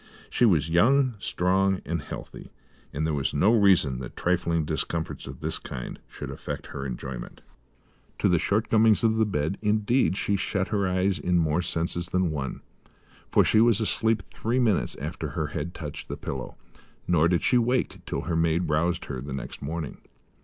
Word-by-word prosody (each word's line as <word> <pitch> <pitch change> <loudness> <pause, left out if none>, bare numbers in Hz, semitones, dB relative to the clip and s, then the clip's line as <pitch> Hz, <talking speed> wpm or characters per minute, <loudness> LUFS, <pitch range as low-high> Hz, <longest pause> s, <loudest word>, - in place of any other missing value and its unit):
She 125 - +3
was 85 -8 +3
young, 125 +10 +4
strong 95 +1 +1
and 85 -1 -2
healthy, - - -8 0.4
and 75 +3 -2
there 80 - 0
was 70 -1 -1
no 100 +10 +4
reason 95 - +4
that 65 -2 -8
trifling 85 -2 +1
discomforts 80 +1 -3
of - - -9
this - - -3
kind 60 - -7
should - - -7
affect - - -6
her 70 -1 -4
enjoyment. 60 -1 -6 0.8
To - - +2
the 85 -2 +3
shortcomings 110 +3 +3
of 110 -1 +3
the 110 -1 +3
bed, 75 0 -1
indeed, 105 +1 +2
she 100 - 0
shut 95 0 -1
her 100 -3 +1
eyes 95 -1 +1
in 90 +4 +1
more 80 0 +2
senses 85 0 -2
than 90 -2 +1
one, 70 -3 -4 0.7
for - - +5
she 110 - +4
was 115 -2 +4
asleep 110 -1 +1
three 115 +3 -2
minutes 105 - +2
after 75 +4 -4
her 80 - -2
head 85 +3 -4
touched 75 -2 -7
the - - -5
pillow, 65 -2 -6 0.5
nor 85 -2 +4
did 85 0 +1
she 125 - +4
wake 125 +2 0
till - - -2
her 85 - -2
maid 80 +1 +1
roused 85 +3 +1
her 65 - -5
the 70 0 -6
next 70 - -6
morning. 80 0 -4
90 Hz, 180 wpm, -26 LUFS, 75-105 Hz, 0.8 s, for